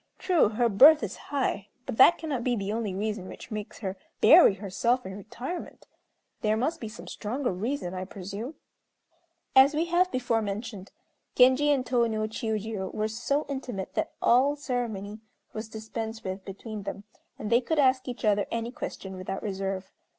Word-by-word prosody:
True, 350 - +3
her 235 +3 +2
birth 275 +7 +7
is 195 - -3
high; 260 -8 -1 0.2
but - - -5
that 265 - +8
cannot 285 -7 -3
be 245 -1 +1
the 200 -1 -2
only 220 -4 -2
reason 205 -1 -3
which - - -10
makes 215 0 -6
her 190 0 -3 0.2
bury 310 - +8
herself 230 +6 0
in 190 0 -6
retirement. 245 - -7 0.6
There 215 0 +2
must 265 +8 -1
be 225 - -4
some 215 - -10
stronger 245 +4 -2
reason, 200 +1 -3
I 185 0 -4
presume." 200 - -7 1.0
As 270 +3 +7
we 320 +2 +1
have 350 +2 +2
before 240 -3 0
mentioned, 205 -1 -5 0.5
Genji 260 +3 +5
and 275 -3 +2
Tô 240 -1 +2
no 215 -1 -2
Chiûjiô 215 -3 -3
were 215 0 -1
so 240 +7 -1
intimate 255 -8 -5
that - - -2
all 265 +5 +4
ceremony 230 -7 -3 0.3
was 215 0 -6
dispensed 220 0 -6
with 190 0 -5
between 210 +2 -7
them, 200 0 -6 0.3
and 215 - -5
they 235 +2 +5
could 315 +6 -1
ask 260 -2 +3
each 245 -1 -4
other 205 -1 +2
any 230 +1 -3
question 190 -6 -6
without 185 +1 -5
reserve. 195 -1 -3
225 Hz, 170 wpm, -28 LUFS, 200-255 Hz, 1.0 s, that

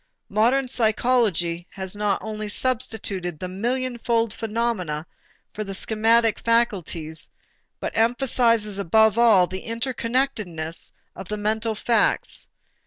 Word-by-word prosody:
Modern 245 +6 +2
psychology 220 -8 +1
has 190 0 -5
not 205 -1 0
only 215 -1 -5
substituted 205 -8 -2
the 185 - -5
millionfold 235 +2 -1
phenomena 210 -9 -2 0.5
for 215 - -4
the 195 -1 -5
schematic 225 +2 +3
faculties, 180 -9 0 0.5
but - - -4
emphasizes 230 -3 +2
above 220 +4 +3
all 215 -6 +6
the 185 +2 -6
interconnectedness 230 -8 -2 0.2
of 190 - -8
the 210 - -3
mental 220 +2 -1
facts. 225 0 +2
220 Hz, 105 wpm, -24 LUFS, 190-235 Hz, 0.5 s, all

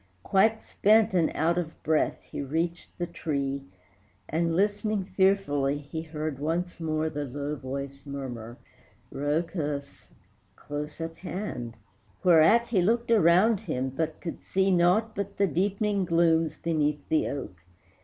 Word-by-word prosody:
Quite 220 +3 +3
spent 215 0 +3
and 170 -4 +3
out 170 +3 +2
of 160 -2 -6
breath 155 -1 +1
he - - -6
reached 165 +5 -3
the 175 - -1
tree, 140 -5 -3 0.6
And, 165 +1 0
listening 205 +1 +1
fearfully, 185 -8 +2
he 145 +2 -6
heard 155 -3 -4
once 170 +4 -2
more 155 -1 -1
The 145 -2 -3
low 145 +3 -4
voice 140 0 -6
murmur 125 -4 -6 0.6
"Rhœcus!" 145 -1 -2 0.5
close 145 +1 -6
at 165 0 -5
hand: 175 - -5 0.5
Whereat 185 +7 +5
he 200 -6 +3
looked 235 +5 +1
around 200 +1 +5
him, 130 - -2
but 155 +4 -3
could 170 - -6
see 190 0 +1
Naught 185 +6 +3
but 200 0 -4
the 200 - +4
deepening 195 +3 0
glooms 165 -2 +2
beneath 150 -3 -1
the 160 - +2
oak. 130 -10 -5
165 Hz, 135 wpm, -27 LUFS, 145-190 Hz, 0.6 s, Whereat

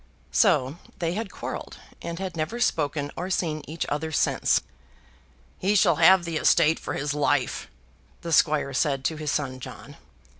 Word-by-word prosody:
So 150 - +3 0.2
they 170 -1 -1
had 210 +1 -4
quarrelled, - - -6 0.2
and 170 0 -5
had 185 -1 -5
never 165 +10 -3
spoken 145 -9 0
or 180 +2 -4
seen 160 -5 -1
each 160 +2 -3
other 160 +2 -2
since. - - +2 1.0
"He 200 +2 +1
shall 175 -6 +4
have 175 +2 +6
the 165 -1 -2
estate 160 0 +4
for - - -5
his 145 0 -2
life," 145 -3 0 0.5
the 170 -1 -3
squire 145 -2 +3
said 135 +1 0
to 160 - 0
his 155 -1 -3
son 135 -3 -2
John. - - -10
160 Hz, 160 wpm, -25 LUFS, 145-170 Hz, 1.0 s, have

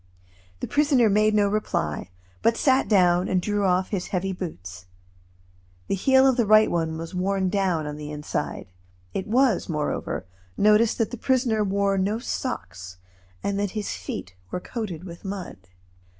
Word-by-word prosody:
The - - -2
prisoner 275 -7 +3
made 215 +1 +3
no 205 -1 +4
reply, 90 - -2 0.3
but 230 0 +2
sat 265 -1 +3
down 180 -3 +4
and 185 - +1
drew 205 +2 0
off 185 0 +2
his 195 -4 -3
heavy 190 +1 -2
boots. 95 - -7 1.0
The - - -2
heel 265 +7 +4
of 265 -2 +4
the 235 - +3
right 215 +1 +6
one 160 -2 -1
was 165 +3 -7
worn 190 +1 0
down 185 -5 0
on 150 0 -5
the 150 0 -7
inside. 150 0 -4 0.5
It 190 +1 -3
was, 245 -3 +2
moreover, 150 - -2 0.3
noticed 215 +2 +4
that 225 - 0
the 245 - -5
prisoner 240 -4 +1
wore 200 0 +1
no 200 +3 0
socks, 95 - -5 0.5
and 200 0 -1
that 205 0 -2
his 210 - -2
feet 90 - -6 0.2
were - - -3
coated 190 -6 -5
with 170 -2 -10
mud. 190 - -7
195 Hz, 165 wpm, -25 LUFS, 175-215 Hz, 1.0 s, right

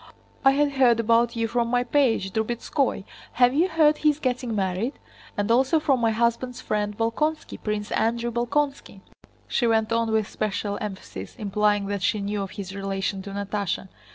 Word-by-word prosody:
"I 270 - +7
had 290 +1 +2
heard 250 -4 +4
about 230 +1 +3
you 230 0 0
from 235 +1 0
my 245 +1 +1
page, 240 -7 +1
Drubetskóy. 235 +2 -1 0.3
Have 245 0 +4
you 325 +6 +3
heard 315 -3 +3
he 305 - +4
is 295 - +1
getting 250 -5 -2
married? 195 +6 -1 0.4
And 205 +2 0
also 265 +7 +4
from 275 -5 +1
my 230 - +3
husband's 235 +2 0
friend 210 -3 -2
Bolkónski, 300 +8 -1
Prince 210 -1 -3
Andrew 235 +2 0
Bolkónski," 240 -3 -2 0.5
she 240 - +1
went 225 -1 +2
on 230 -1 +1
with 220 -2 +1
special 205 -1 -3
emphasis, 190 - -7
implying 205 0 +1
that 200 0 -3
she 210 - +1
knew 205 +1 -2
of 195 - -4
his 190 -1 -7
relation 195 0 -2
to 200 - -8
Natásha. 200 -1 -3
230 Hz, 175 wpm, -25 LUFS, 205-250 Hz, 0.5 s, I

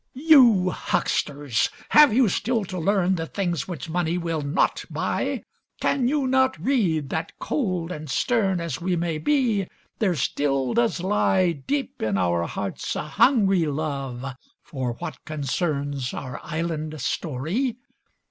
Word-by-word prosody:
You 250 - +6
hucksters, 145 -8 0 0.2
have 300 -2 +7
you 245 +2 +4
still 225 +3 0
to 185 0 -5
learn, 190 +1 +2
The 165 -3 -2
things 175 -5 -2
which 175 -2 -6
money 170 +1 -1
will 165 -3 -2
not 145 +4 +1
buy? - - -2 0.4
Can 260 -3 +1
you 285 0 +1
not 260 0 +2
read 175 - +1
that, 160 +1 -3
cold 185 - -2
and 155 -3 -6
stern 195 - +1
As 170 0 -4
we 180 +1 0
may 165 -2 -1
be, 225 - +1 0.3
there 190 -5 +2
still 135 -3 0
does 230 -6 +1
lie 185 -2 +2
Deep 245 - -3
in 105 -3 0
our 85 -2 +1
hearts - - -4
a - - -2
hungry 200 - +3
love 140 -4 -3 0.4
For 130 -4 -3
what - - -7
concerns 145 -2 -2
our 130 -2 -6
island 155 -1 -3
story? 165 - -2
175 Hz, 140 wpm, -24 LUFS, 145-215 Hz, 0.4 s, have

